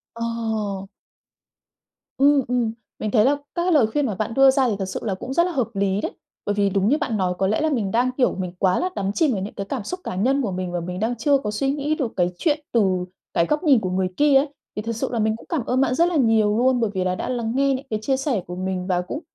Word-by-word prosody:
Ồ! 220 -4 -3 1.3
Ừm, 280 +1 +5
ừm. 245 -3 0 0.3
Mình 215 - -2
thấy 215 -2 +4
là 270 - +5
các 285 - -15 0.2
cái 360 - +1
lời 270 -9 +5
khuyên 290 +5 0
mà 215 -6 -2
bạn 215 +3 -3
đưa 270 +2 +6
ra 265 -1 +2
thì 210 - 0
thật 190 - -1
sự 190 - -4
là 205 -4 -1
cũng 255 +7 -6
rất 340 +4 +3
là 360 - -2
hợp 260 -9 0
lý 195 0 0
đấy. - - -3 0.3
Bởi 205 - 0
vì 200 -1 +2
đúng 195 +2 +1
như 295 - +3
bạn 225 -7 -2
nói 185 -2 0
có 190 - +1
lẽ 215 +8 +1
là 315 - +2
mình 225 -9 -1
đang, 245 +4 +2
kiểu, 255 - +2
mình 185 -2 -4
quá 185 -2 +2
là 365 - 0
đắm 195 0 -1
chìm 310 +3 +2
vào 195 - -2
những 200 - -5
cái 200 - -5
cảm 240 +1 -4
xúc 365 - -5
cá - - -4
nhân 260 +9 +2
của 220 -7 -1
mình 185 -1 -3
và 175 - -2
mình 180 +2 -5
đang 230 +3 0
chưa 280 +4 +3
có 210 -6 -4
suy 270 +6 0
nghĩ 295 +2 -1
được 260 -7 -3
cái 175 -1 +2
chuyện 300 -2 +1
từ 190 -5 +2 0.3
cái 170 - +3
góc 300 - -1
nhìn 280 -7 +5
của 190 -4 -3
người 185 0 0
kia 290 -1 +4
ấy. 275 +3 +5 0.3
Thì 210 - -2
thật 230 +1 -4
sự 225 - -2
là 235 - -1
mình 220 0 +1
cũng - - -15
cảm 310 -9 -1
ơn 255 +1 +1
bạn 255 -2 +2
rất 335 - +4
là 350 - -2
nhiều 220 -6 +3
luôn 255 +1 +3
bởi 225 -2 +1
vì 190 -2 -1
là 185 0 0
đã 205 - -4
lắng 235 -3 -2
nghe 275 0 +3
những 265 +2 -4
cái 215 -1 -1
chia 265 +4 +1
sẻ 265 -7 -1
của 180 - -6
mình 185 0 -3
và 180 -1 +1
cũng 180 +11 -5
225 Hz, 295 wpm, -23 LUFS, 195-270 Hz, 1.3 s, đưa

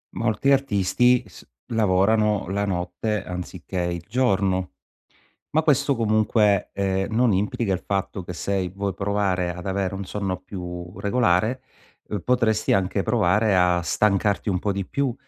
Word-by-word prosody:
Molti 115 +4 +1
artisti 125 -1 +3
s 95 - -15 0.2
lavorano 105 -1 +2
la 100 +1 0
notte 90 +3 -2
anziché 90 0 -6
il 85 -1 -2
giorno; 95 -6 +1 0.8
ma 160 +1 +2
questo 140 -2 +2
comunque, 110 -3 +2
ehm, 95 +1 -1
non 120 -1 +3
implica 100 +2 0
il 95 - 0
fatto 95 -1 -2
che 90 - -6
sei 95 +1 -2
vuoi 100 +2 -3
provare 95 -2 -1
ad 90 +1 -8
avere 95 0 -1
un 95 +1 -5
sonno 95 -2 -3
più 90 -1 -8
regolare, 110 +2 +1 0.6
potresti 115 -4 +2
anche 95 +1 +1
provare 105 -2 +2
a 90 -1 +3
stancarti 100 +4 +1
un 95 -2 +1
po' 100 +2 -1
di 100 0 -3
più 135 +5 -1
100 Hz, 140 wpm, -24 LUFS, 90-110 Hz, 0.8 s, artisti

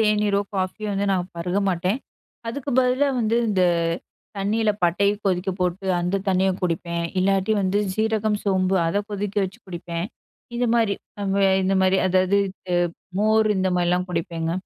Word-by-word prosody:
தேனீரோ! 210 -2 +2
காஃபியோ! 190 +3 -2
வந்து 200 +1 -1
நான் 185 -1 -1
பருக 180 +3 -1
மாட்டேன். 185 +6 0 0.5
அதுக்கு 280 +3 -4
பதிலா 255 +3 +2
வந்து 225 +1 +1
இந்த 190 -3 +2 0.7
தண்ணீல 210 +2 +1
பட்டைய 200 +4 +3
கொதிக்க 185 0 +1
போட்டு 180 +2 -1
அந்த 180 +3 0
தண்ணிய 190 0 +3
குடிப்பேன். 170 -1 -1 0.2
இல்லாட்டி 195 +2 +2
வந்து 190 +2 +1 0.2
சீரகம், 220 -1 0
சோம்பு 190 -1 +2
அத 200 +5 0
கொதிக்க 205 0 -4
வச்சு 190 0 -7
குடிப்பேன். 170 0 -4 0.5
இந்தமாரி 235 -3 +2 0.3
அவுங்க 200 0 0 0.2
இந்தமாரி 190 0 +3
அதாவது 185 +1 +3
இது 185 -1 -4 0.4
மோர் 215 +1 +3
இந்தமாரிலாம் 180 -1 +1
குடிப்பேங்க. 165 -1 -2
195 Hz, 135 wpm, -23 LUFS, 180-210 Hz, 0.7 s, பட்டைய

